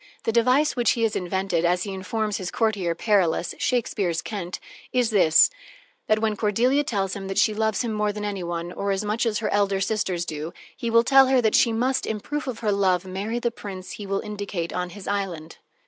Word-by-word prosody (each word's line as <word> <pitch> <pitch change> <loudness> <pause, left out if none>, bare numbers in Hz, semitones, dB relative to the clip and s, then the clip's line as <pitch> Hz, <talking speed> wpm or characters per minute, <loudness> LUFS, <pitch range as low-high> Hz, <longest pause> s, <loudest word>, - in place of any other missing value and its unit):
The - - 0
device 255 +6 +3
which 240 -3 +3
he 230 - -1
has 225 - +1
invented, 180 -1 -1
as 180 +1 +2
he 200 - -5
informs 210 +3 -2
his 185 -2 -4
courtier, 200 -7 0
Perillus 180 -4 +1
(Shakespeare's 200 -8 0
Kent), 185 -4 -5 0.3
is 245 -2 +1
this, 180 - +5 0.6
that 215 - +3
when 215 -1 0
Cordelia 235 +8 +2
tells 195 -8 -2
him 195 -1 -6
that 195 - -4
she 215 - +4
loves 220 +2 0
him 230 -2 -2
more 210 -1 0
than 210 0 -5
any 200 -3 -3
one 170 0 -4
or 200 +2 -3
as 195 +2 -1
much 215 +3 0
as 215 -2 0
her 210 -1 -1
elder 200 -1 +2
sisters 190 -4 -1
do, 155 +1 -5 0.2
he 235 - -3
will 230 0 +5
tell 270 +1 +6
her 260 0 +4
that 220 -2 +2
she 235 - +4
must, 255 +4 0
in 215 - -2
proof 295 +7 -4
of 240 -3 -5
her 215 -2 +1
love, 190 -3 +2
marry 195 +5 -3
the 240 0 -1
prince 190 -5 -8
he 205 - -7
will 195 0 -1
indicate 200 -5 -4
on 180 0 -2
his 190 +2 -10
island. 185 -6 -3
205 Hz, 220 wpm, -24 LUFS, 185-225 Hz, 0.6 s, tell